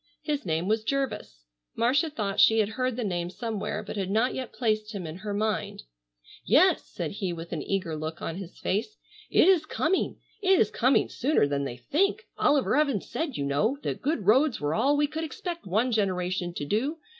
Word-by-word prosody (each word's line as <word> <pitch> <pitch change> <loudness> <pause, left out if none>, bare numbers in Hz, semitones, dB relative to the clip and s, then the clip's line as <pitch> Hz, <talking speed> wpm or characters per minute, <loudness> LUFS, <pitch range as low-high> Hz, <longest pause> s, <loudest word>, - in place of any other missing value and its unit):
His 295 - -2
name 165 +2 0
was 215 +1 +1
Jervis. 220 - -3 0.3
Marcia 270 +7 +2
thought 210 -8 -3
she 225 - +6
had 215 -2 +2
heard 255 +2 -1
the 245 - -2
name 175 -4 -2
somewhere, 215 0 -4
but 210 - -7
had 190 -2 -2
not 225 +5 +2
yet 260 -2 -5
placed 215 -2 -1
him 185 -3 -4
in 160 +1 -6
her 205 +2 -5
mind: 210 - -2 0.6
"Yes," - - +4
said - - -4
he, 195 -3 -3
with 165 0 -7
an 160 - -2
eager 190 -5 -2
look 155 +2 -5
on 165 - -4
his 190 -2 -9
face, 215 - -2 0.3
"it - - +5
is 350 -5 +4
coming, 345 +5 0 0.2
it 380 -1 +4
is 210 - +3
coming 255 +3 +3
sooner 270 - +1
than 140 -1 -1
they 120 -3 -5
think. 390 - 0 0.2
Oliver 285 -3 +3
Evans 280 -9 +1
said, 320 -5 -2
you 140 - -1
know, 205 - +1
that - - -3
good 285 - -1
roads 260 +6 +4
were 145 +1 -1
all 275 - +2
we 295 - +3
could 310 +2 -4
expect 335 - -5
one 220 +7 +1
generation 185 -4 0
to 145 - -3
do. 250 - 0
215 Hz, 200 wpm, -27 LUFS, 185-275 Hz, 0.6 s, she